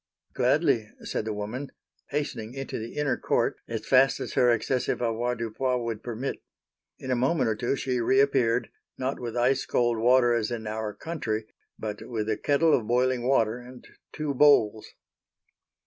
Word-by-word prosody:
"Gladly," 130 -3 +2
said - - -3
the 110 - -2
woman, 110 +7 -5 0.4
hastening 130 -5 -3
into 135 -3 -4
the 115 +1 -7
inner 150 -2 0
court - - 0
as 115 -2 -4
fast 135 +1 +4
as - - -5
her 125 - +4
excessive 120 +2 0
avoirdupois 120 +1 -1
would 115 -3 -4
permit. 120 +3 -4 0.6
In 130 - -5
a - - +3
moment 130 +2 +1
or - - -1
two 120 +5 -1
she 130 -2 -1
reappeared, 125 -2 +2 0.3
not 130 +1 -2
with 120 -1 -5
ice 130 +2 +2
cold 120 -2 +1
water 120 +1 +4
as 110 -2 0
in 115 -2 -4
our 110 -1 -4
country, 115 -10 -3 0.3
but 105 -1 -5
with 110 -3 -4
a - - +1
kettle 150 +6 +3
of 110 - +1
boiling 125 0 +1
water 115 -3 +2
and 125 0 -13 0.2
two 150 -2 -3
bowls. 120 -7 +4
120 Hz, 165 wpm, -27 LUFS, 115-135 Hz, 0.6 s, fast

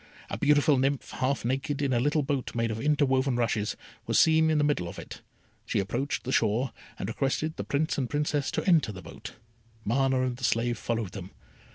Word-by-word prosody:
A - - -2
beautiful 145 -1 +4
nymph, 135 +1 0
half 130 -2 -1
naked, 135 +3 -1
in 140 -2 +1
a 120 - +2
little 145 +4 +2
boat 135 -3 -2
made 115 -1 0
of 110 +1 -4
interwoven 135 -3 +2
rushes, 115 -3 0 0.3
was - - +2
seen 160 0 +5
in 155 - +2
the 150 - +3
middle 145 -12 +1
of - - -8
it. - - -9 0.4
She - - -2
approached 120 +8 -2
the 130 - -3
shore, 120 +2 +1 0.2
and - - -4
requested 135 +7 -1
the - - -4
Prince 150 +1 0
and 130 -3 -1
Princess 145 -1 0
to - - -2
enter 165 - +4
the 90 -3 -9
boat. - - -10 0.5
Mana 130 +3 +2
and 125 -1 -2
the 125 - -11
slave 115 0 +1
followed 115 -5 -2
them. 95 -2 -7
130 Hz, 205 wpm, -28 LUFS, 115-145 Hz, 0.5 s, seen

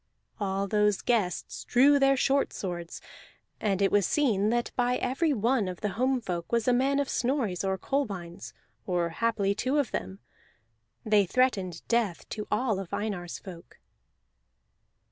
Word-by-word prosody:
All 195 -1 -1
those 210 -1 +2
guests 210 -8 -1
drew 280 +3 +5
their 275 0 +4
short 275 +2 +2
swords; 175 -3 -5 0.6
and 200 -2 0
it 195 - +3
was 205 -3 +3
seen 215 -9 +2
that 240 +1 0
by 245 0 +1
every 295 +7 0
one 235 -3 +1
of 180 -1 -6
the 210 - 0
homefolk 225 -7 -1
was 235 -1 +1
a 250 - +5
man 270 +3 +2
of 285 - 0
Snorri's 240 -10 -1
or 190 0 0
Kolbein's, 195 -9 -3 0.4
or 175 -2 0
haply 200 +2 0
two 255 +7 -1
of 285 -5 0
them. 95 +1 -4 0.9
They 210 -3 +3
threatened 195 -8 0
death 230 -8 0
to 210 -1 -5
all 230 -6 0
of 190 -3 -7
Einar's 195 -5 -3
folk. 175 -4 -12
210 Hz, 150 wpm, -28 LUFS, 190-255 Hz, 0.9 s, drew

